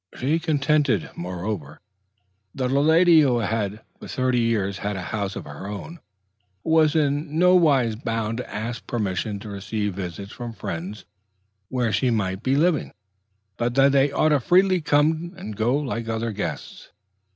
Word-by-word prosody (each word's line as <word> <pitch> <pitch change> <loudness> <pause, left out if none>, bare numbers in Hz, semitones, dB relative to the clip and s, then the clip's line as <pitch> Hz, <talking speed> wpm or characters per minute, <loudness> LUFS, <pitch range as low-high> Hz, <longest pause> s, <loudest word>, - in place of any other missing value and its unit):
She 150 +6 +1
contended, 150 - +1
moreover, 90 -4 -5 0.8
that 130 -1 -1
a 140 - +3
lady 160 +2 +6
who 130 -5 +3
had 110 -2 -2 0.2
for - - -9
thirty 130 -1 0
years 100 -4 0
had 100 0 -3
a 95 - -4
house 100 -2 -2
of 100 - -6
her 75 +6 -8
own, 130 +12 -7 0.6
was 160 -2 +3
in 150 0 0
nowise 160 -10 +4
bound 115 0 -3
to 125 - -7
ask 115 +2 -5
permission 105 -2 -2
to 105 - -8
receive 105 0 -3
visits 95 +1 -6
from 120 -1 -7
friends 95 0 -6 0.6
where 125 -3 0
she 130 - +2
might 100 -4 -1
be 130 +2 +1
living, 160 +1 +1 0.6
but 120 0 -1
that 135 +1 +5
they 140 0 +3
ought 155 +2 +2
freely 185 +5 +3
to - - -11
come 160 +4 +2
and 110 - -7
go 115 +5 +1
like 115 -6 -3
other 115 +1 -2
guests. 105 0 -6
120 Hz, 160 wpm, -24 LUFS, 105-145 Hz, 0.8 s, lady